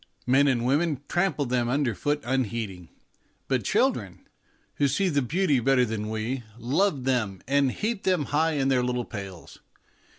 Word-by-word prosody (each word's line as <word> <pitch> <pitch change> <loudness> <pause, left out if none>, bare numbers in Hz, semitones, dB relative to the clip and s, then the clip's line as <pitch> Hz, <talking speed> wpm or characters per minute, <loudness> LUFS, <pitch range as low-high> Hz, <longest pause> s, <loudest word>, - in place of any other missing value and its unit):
Men 135 +3 +4
and 120 -3 +1
women 145 +1 +1
trample 175 -5 0
them 120 -1 0
underfoot 145 +2 0
unheeding, 115 -8 -2 0.6
but - - 0
children, - - 0 0.5
who 145 - +2
can - - +3
see 195 +4 +1
the 145 -4 +1
beautiful 145 -1 +1
better 135 -1 +4
than 105 -2 -4
we, 110 +4 -3 0.2
love 140 - 0
them 115 -8 -1
and 140 -1 +2
heap 215 - -2
them 180 -6 +1
high 160 +3 +1
in 135 -2 +1
their 130 -2 +3
little 125 -1 -1
pails. 95 -5 -9
130 Hz, 160 wpm, -26 LUFS, 120-145 Hz, 0.6 s, Men